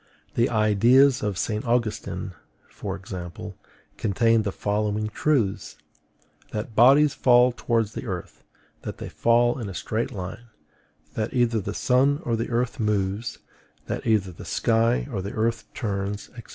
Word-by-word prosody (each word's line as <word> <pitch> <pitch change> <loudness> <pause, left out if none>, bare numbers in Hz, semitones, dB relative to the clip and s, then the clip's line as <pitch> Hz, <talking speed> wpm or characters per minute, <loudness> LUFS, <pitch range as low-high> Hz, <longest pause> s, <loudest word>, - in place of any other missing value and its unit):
The 120 +3 +2
ideas 120 +5 +4
of 105 -3 -2
St. 110 +2 -2
Augustine, 120 -2 -2 0.4
for 95 -2 -5
example, 90 -3 -8 0.4
contained 115 +2 +2
the 100 - -1
following 105 +1 -1
truths: 115 -5 0 0.7
that 110 +1 -5
bodies 140 +5 +6
fall 125 0 +5
towards 115 -3 -1
the - - -6
earth, 90 - -6 0.4
that - - -6
they - - -7
fall 120 +2 +2
in 110 -4 -4
a 95 - -7
straight 115 +2 -2
line, 95 +5 -7 0.7
that 110 +3 -3
either 120 -3 +2
the 100 +2 -5
sun 135 +3 +2
or 115 - 0
the 115 - -3
earth 120 0 -1
moves, 105 0 -1 0.5
that - - -4
either 105 -4 +2
the 85 - -11
sky 115 +2 +1
or 100 -5 -2
the 100 +2 -6
earth 115 +1 -1
turns, 100 -2 -3
&c. 120 - -8
110 Hz, 150 wpm, -25 LUFS, 100-120 Hz, 0.7 s, bodies